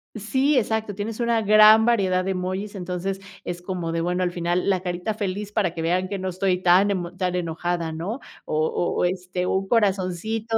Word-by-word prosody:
Sí, 260 Hz, +7 st, +1 dB
exacto, 220 Hz, -3 st, -1 dB
tienes 210 Hz, +3 st, -5 dB
una 235 Hz, -1 st, +1 dB
gran 215 Hz, +1 st, +7 dB
variedad 190 Hz, -6 st, +2 dB
de 195 Hz, -, 0 dB
emojis 185 Hz, +2 st, -3 dB
entonces 185 Hz, 0 st, -4 dB, 0.2 s
es 175 Hz, 0 st, -5 dB
como 180 Hz, -2 st, -4 dB
de 165 Hz, 0 st, -1 dB
bueno, 180 Hz, +2 st, 0 dB
al 180 Hz, -, 0 dB
final 175 Hz, +1 st, -1 dB
la 190 Hz, -2 st, +2 dB
carita 180 Hz, +3 st, -3 dB
feliz 205 Hz, 0 st, -4 dB
para 195 Hz, -5 st, 0 dB
que 165 Hz, -, -3 dB
vean 180 Hz, +3 st, 0 dB
que 200 Hz, -, -3 dB
no 190 Hz, 0 st, -3 dB
estoy 185 Hz, 0 st, 0 dB
tan 185 Hz, +3 st, +5 dB
emo 180 Hz, -3 st, -3 dB
tan 180 Hz, -1 st, -1 dB
enojada, 170 Hz, -1 st, -2 dB
¿no? 180 Hz, -, -4 dB, 0.3 s
O 155 Hz, +1 st, 0 dB, 0.3 s
o, -, -, +2 dB
este, 180 Hz, 0 st, -2 dB
un 190 Hz, +1 st, 0 dB
corazoncito. 215 Hz, +1 st, 0 dB
185 Hz, 195 wpm, -24 LUFS, 180-210 Hz, 0.3 s, gran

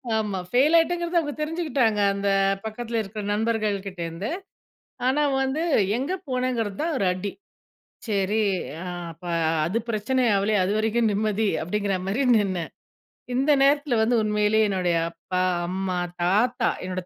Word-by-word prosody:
ஆமா, 210 Hz, -4 st, -1 dB
ஃபெயில் 275 Hz, -, +4 dB
ஆகிட்டேன்றத 345 Hz, +1 st, +1 dB
அவங்க 295 Hz, -3 st, -3 dB
தெரிஞ்சுக்கிட்டாங்க, 295 Hz, -9 st, 0 dB
அந்த 200 Hz, 0 st, -1 dB, 0.4 s
பக்கத்தில 230 Hz, +1 st, -3 dB
இருக்கிற 210 Hz, +1 st, -6 dB
நண்பர்கள் 215 Hz, -1 st, 0 dB
கிட்ட 190 Hz, -2 st, -8 dB
இருந்து. 165 Hz, +6 st, -5 dB, 0.8 s
ஆனா 270 Hz, +4 st, +2 dB, 0.2 s
வந்து 265 Hz, +4 st, -1 dB, 0.3 s
எங்கே 285 Hz, +9 st, -2 dB
போனேங்கிறது 250 Hz, -5 st, -1 dB
தான் 325 Hz, 0 st, -1 dB
ஒரு -, -, 0 dB
அடி. 185 Hz, +2 st, -4 dB, 0.8 s
சரி. 205 Hz, +1 st, +1 dB, 0.4 s
ஆ -, -, -6 dB, 0.3 s
அப்ப 165 Hz, +2 st, -18 dB, 0.4 s
அது 195 Hz, +7 st, 0 dB
பிரச்சனை 230 Hz, +4 st, 0 dB
ஆகலையே, 205 Hz, +2 st, +2 dB
அது 190 Hz, -, 0 dB
வரைக்கும் 220 Hz, 0 st, +1 dB
நிம்மதி, 215 Hz, +1 st, 0 dB
அப்படிங்கிற 200 Hz, +3 st, -1 dB
மாரி 210 Hz, +8 st, 0 dB, 0.2 s
நின்னேன். 185 Hz, -5 st, -2 dB, 0.6 s
இந்த 270 Hz, +4 st, +2 dB
நேரத்துல 285 Hz, -2 st, +3 dB
வந்து 225 Hz, +2 st, +3 dB
உண்மையிலேயே 210 Hz, 0 st, +2 dB
என்னுடைய 180 Hz, -3 st, 0 dB
அப்பா, 175 Hz, +2 st, -3 dB, 0.3 s
அம்மா, 185 Hz, 0 st, -2 dB, 0.2 s
தாத்தா 225 Hz, +8 st, +2 dB
என்னுடைய 185 Hz, -1 st, -4 dB
215 Hz, 135 wpm, -24 LUFS, 195-255 Hz, 0.8 s, ஃபெயில்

